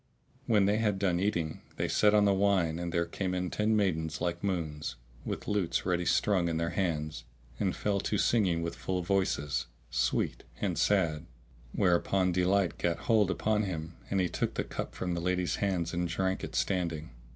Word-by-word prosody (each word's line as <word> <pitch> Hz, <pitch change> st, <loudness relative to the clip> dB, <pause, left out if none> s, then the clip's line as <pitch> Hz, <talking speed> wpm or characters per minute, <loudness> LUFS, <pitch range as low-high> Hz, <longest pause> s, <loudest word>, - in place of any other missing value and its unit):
When 105 Hz, -3 st, +4 dB
they 105 Hz, +2 st, +3 dB
had 105 Hz, -3 st, +1 dB
done 95 Hz, -3 st, +1 dB
eating, 85 Hz, -6 st, -1 dB
they -, -, -1 dB
set 105 Hz, 0 st, +4 dB
on 105 Hz, -1 st, +5 dB
the 100 Hz, -, +4 dB
wine 95 Hz, -4 st, +2 dB
and 85 Hz, -1 st, -3 dB
there 85 Hz, 0 st, +1 dB
came 90 Hz, +2 st, -3 dB
in 90 Hz, -1 st, -2 dB
ten 110 Hz, +1 st, +1 dB
maidens 80 Hz, -7 st, 0 dB
like 85 Hz, 0 st, -2 dB
moons, 80 Hz, -8 st, -2 dB, 0.3 s
with -, -, -4 dB
lutes 100 Hz, -5 st, 0 dB
ready 90 Hz, -1 st, +1 dB
strung 90 Hz, -1 st, +2 dB
in 80 Hz, -, -1 dB
their 85 Hz, +1 st, -1 dB
hands, 75 Hz, -8 st, -2 dB, 0.4 s
and 95 Hz, -3 st, 0 dB
fell 100 Hz, -1 st, 0 dB
to 105 Hz, -, -1 dB
singing 95 Hz, -7 st, +2 dB
with 85 Hz, -, -3 dB
full 90 Hz, -1 st, -2 dB
voices, 85 Hz, -6 st, 0 dB, 0.2 s
sweet -, -, 0 dB, 0.2 s
and 90 Hz, -6 st, -1 dB
sad, 85 Hz, -5 st, +2 dB, 0.4 s
whereupon 90 Hz, +1 st, +2 dB
delight 90 Hz, +1 st, +1 dB
gat 85 Hz, -1 st, 0 dB
hold 110 Hz, -4 st, +3 dB
upon 105 Hz, +2 st, +1 dB
him 85 Hz, -5 st, -4 dB, 0.2 s
and 100 Hz, -, +1 dB
he 90 Hz, -, +2 dB
took -, -, -2 dB
the -, -, 0 dB
cup -, -, -5 dB
from 90 Hz, -1 st, -2 dB
the 85 Hz, -, -2 dB
lady's 90 Hz, 0 st, 0 dB
hands 90 Hz, -4 st, -1 dB
and 85 Hz, 0 st, 0 dB
drank 95 Hz, +2 st, -1 dB
it -, -, -5 dB
standing. 85 Hz, -6 st, -1 dB
90 Hz, 185 wpm, -30 LUFS, 85-100 Hz, 0.4 s, on